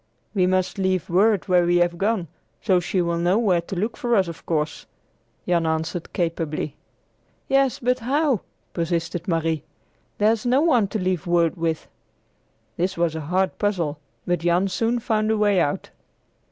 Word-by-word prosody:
"We 185 Hz, -3 st, +2 dB
must 185 Hz, +1 st, 0 dB
leave 185 Hz, -3 st, 0 dB
word 205 Hz, +3 st, +3 dB
where 180 Hz, -2 st, +4 dB
we 175 Hz, 0 st, +3 dB
have 175 Hz, 0 st, +1 dB
gone, 200 Hz, -4 st, 0 dB, 0.3 s
so 190 Hz, -4 st, +2 dB
she 180 Hz, +1 st, 0 dB
will 170 Hz, 0 st, -1 dB
know 175 Hz, +4 st, +2 dB
where 190 Hz, -7 st, +2 dB
to 170 Hz, -, -7 dB
look 215 Hz, +6 st, -2 dB
for 240 Hz, -4 st, 0 dB
us, 190 Hz, -4 st, +3 dB
of 170 Hz, -, -8 dB
course," 155 Hz, -2 st, -2 dB, 0.6 s
Jan 170 Hz, -2 st, +2 dB
answered 160 Hz, +1 st, -2 dB
capably. 165 Hz, -3 st, -2 dB, 0.7 s
"Yes, 270 Hz, -1 st, +2 dB
but 250 Hz, +1 st, 0 dB
how?" 270 Hz, -, +1 dB, 0.3 s
persisted 170 Hz, 0 st, -2 dB
Marie. 165 Hz, -3 st, 0 dB, 0.5 s
"There's 215 Hz, +1 st, +2 dB
no 255 Hz, +3 st, +3 dB
one 250 Hz, -11 st, +3 dB
to 215 Hz, -, -3 dB
leave 185 Hz, -2 st, -1 dB
word 170 Hz, -1 st, +2 dB
with!" 165 Hz, -2 st, -2 dB, 0.9 s
This 185 Hz, +2 st, -1 dB
was 170 Hz, -2 st, +1 dB
a 160 Hz, -, -3 dB
hard 185 Hz, +5 st, -1 dB
puzzle, 170 Hz, -8 st, -1 dB, 0.3 s
but 175 Hz, 0 st, 0 dB
Jan 175 Hz, +3 st, +2 dB
soon 230 Hz, +5 st, 0 dB
found 215 Hz, -2 st, 0 dB
a 220 Hz, -, +2 dB
way 205 Hz, -2 st, +3 dB
out. 145 Hz, -4 st, -1 dB
180 Hz, 165 wpm, -23 LUFS, 170-215 Hz, 0.9 s, where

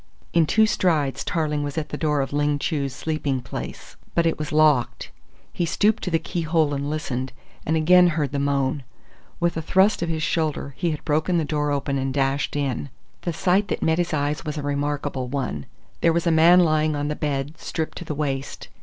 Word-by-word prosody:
In 165 Hz, -2 st, +4 dB
two 220 Hz, +6 st, +4 dB
strides 160 Hz, -10 st, +1 dB
Tarling 150 Hz, -3 st, -1 dB
was 145 Hz, +1 st, -4 dB
at 155 Hz, -, -2 dB
the -, -, -4 dB
door 150 Hz, -2 st, +1 dB
of 135 Hz, -, -4 dB
Ling 145 Hz, 0 st, +1 dB
Chu's 140 Hz, -2 st, -1 dB
sleeping 145 Hz, 0 st, -2 dB
place, 125 Hz, -, -8 dB, 0.2 s
but 170 Hz, -, +3 dB
it 165 Hz, -, +1 dB
was 150 Hz, -, -4 dB
locked. 150 Hz, -5 st, +2 dB, 0.4 s
He -, -, -1 dB
stooped 205 Hz, +5 st, +2 dB
to -, -, -2 dB
the 165 Hz, -, +2 dB
key 170 Hz, +2 st, -4 dB
hole 160 Hz, -2 st, +1 dB
and 140 Hz, +1 st, -2 dB
listened, 130 Hz, -4 st, -3 dB, 0.3 s
and 160 Hz, +1 st, +2 dB
again 180 Hz, +3 st, +6 dB
heard 155 Hz, -5 st, 0 dB
the 140 Hz, -, -1 dB
moan. 140 Hz, 0 st, 0 dB, 0.6 s
With 170 Hz, -1 st, +1 dB
a -, -, -1 dB
thrust 190 Hz, +5 st, +3 dB
of 170 Hz, -, -1 dB
his 160 Hz, -1 st, -1 dB
shoulder 155 Hz, -3 st, -1 dB
he 170 Hz, +7 st, -1 dB
had 155 Hz, -2 st, -4 dB
broken 155 Hz, +4 st, +1 dB
the 160 Hz, -, +1 dB
door 150 Hz, 0 st, -1 dB
open 140 Hz, -1 st, -1 dB
and 135 Hz, 0 st, -1 dB
dashed 135 Hz, +1 st, 0 dB
in. 140 Hz, -1 st, -2 dB, 0.3 s
The 175 Hz, -, -2 dB
sight 190 Hz, +5 st, +2 dB
that -, -, -2 dB
met 160 Hz, +1 st, +2 dB
his 175 Hz, -1 st, 0 dB
eyes 145 Hz, -1 st, -1 dB
was 155 Hz, -1 st, -4 dB
a 145 Hz, -, -3 dB
remarkable 145 Hz, -2 st, -2 dB
one. 125 Hz, -, -3 dB, 0.3 s
There 165 Hz, -, +4 dB
was 170 Hz, +1 st, 0 dB
a 170 Hz, -, +3 dB
man 170 Hz, +3 st, +6 dB
lying 155 Hz, -2 st, +2 dB
on 145 Hz, 0 st, -2 dB
the 150 Hz, -, -2 dB
bed, 145 Hz, +2 st, -3 dB
stripped 160 Hz, -1 st, -4 dB
to -, -, -6 dB
the 150 Hz, -, -4 dB
waist. 140 Hz, -2 st, -3 dB
150 Hz, 215 wpm, -23 LUFS, 140-165 Hz, 0.6 s, again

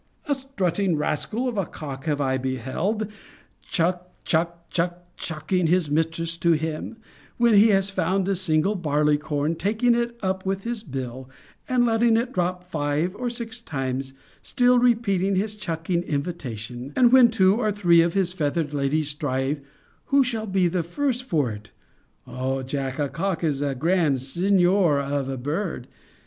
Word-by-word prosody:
A 290 Hz, -, +2 dB
strutting 200 Hz, -, -1 dB
rascal 155 Hz, -, -1 dB
of 235 Hz, -5 st, -2 dB
a 195 Hz, -, 0 dB
cock 140 Hz, -2 st, -8 dB
have 150 Hz, -2 st, 0 dB
I 130 Hz, -2 st, 0 dB
beheld 130 Hz, -, -2 dB, 0.5 s
chuck, 180 Hz, +1 st, -1 dB, 0.2 s
chuck, 170 Hz, +1 st, -1 dB
chuck, 175 Hz, 0 st, -2 dB
chuck 155 Hz, +2 st, -5 dB
ing 180 Hz, -2 st, +3 dB
his 170 Hz, -3 st, +2 dB
mistress 165 Hz, +2 st, 0 dB
to 170 Hz, 0 st, +3 dB
him, 160 Hz, +7 st, -3 dB, 0.4 s
when 235 Hz, -1 st, +4 dB
he 205 Hz, +2 st, +7 dB
has 195 Hz, -2 st, +2 dB
found 185 Hz, +1 st, 0 dB
a 195 Hz, -, +1 dB
single 175 Hz, +1 st, +2 dB
barley 150 Hz, -5 st, +1 dB
corn, 150 Hz, +1 st, -1 dB
taking 220 Hz, +8 st, +1 dB
it 235 Hz, 0 st, -1 dB
up 190 Hz, 0 st, -1 dB
with 195 Hz, 0 st, -2 dB
his 235 Hz, -2 st, -3 dB
bill, 130 Hz, -, -6 dB, 0.4 s
and 250 Hz, -1 st, +3 dB
letting 225 Hz, 0 st, +3 dB
it 240 Hz, +2 st, -1 dB
drop 180 Hz, 0 st, -1 dB
five 155 Hz, +1 st, -1 dB
or 245 Hz, +2 st, -2 dB
six 235 Hz, -1 st, -5 dB
times, 135 Hz, -, -3 dB, 0.3 s
still 245 Hz, 0 st, +3 dB
repeating 200 Hz, -6 st, +2 dB
his 210 Hz, +3 st, -1 dB
chucking 170 Hz, -3 st, -2 dB
invitation: 135 Hz, -6 st, -5 dB
and 245 Hz, -2 st, +5 dB
when 255 Hz, -2 st, +8 dB
two 190 Hz, -3 st, +4 dB
or 215 Hz, -3 st, +1 dB
three 175 Hz, -5 st, +4 dB
of 170 Hz, +2 st, 0 dB
his 185 Hz, -2 st, +1 dB
feathered 150 Hz, -2 st, -1 dB
ladies 145 Hz, +2 st, 0 dB
strive 145 Hz, 0 st, -1 dB, 0.4 s
who 275 Hz, 0 st, +4 dB
shall 225 Hz, -3 st, -2 dB
be 190 Hz, -2 st, +2 dB
the 175 Hz, +1 st, 0 dB
first 255 Hz, -, -2 dB
for 150 Hz, -, 0 dB
it 105 Hz, 0 st, -9 dB, 0.6 s
[O 130 Hz, +1 st, -3 dB
Jack! 135 Hz, 0 st, -3 dB
a 145 Hz, -2 st, 0 dB
cock 165 Hz, +5 st, -2 dB
is 145 Hz, -4 st, 0 dB
a 140 Hz, -2 st, -1 dB
grand 160 Hz, -1 st, +2 dB
signor 180 Hz, +2 st, +2 dB
of 140 Hz, -1 st, -2 dB
a 135 Hz, -, -3 dB
bird! 150 Hz, +1 st, -3 dB
170 Hz, 165 wpm, -24 LUFS, 145-205 Hz, 0.6 s, when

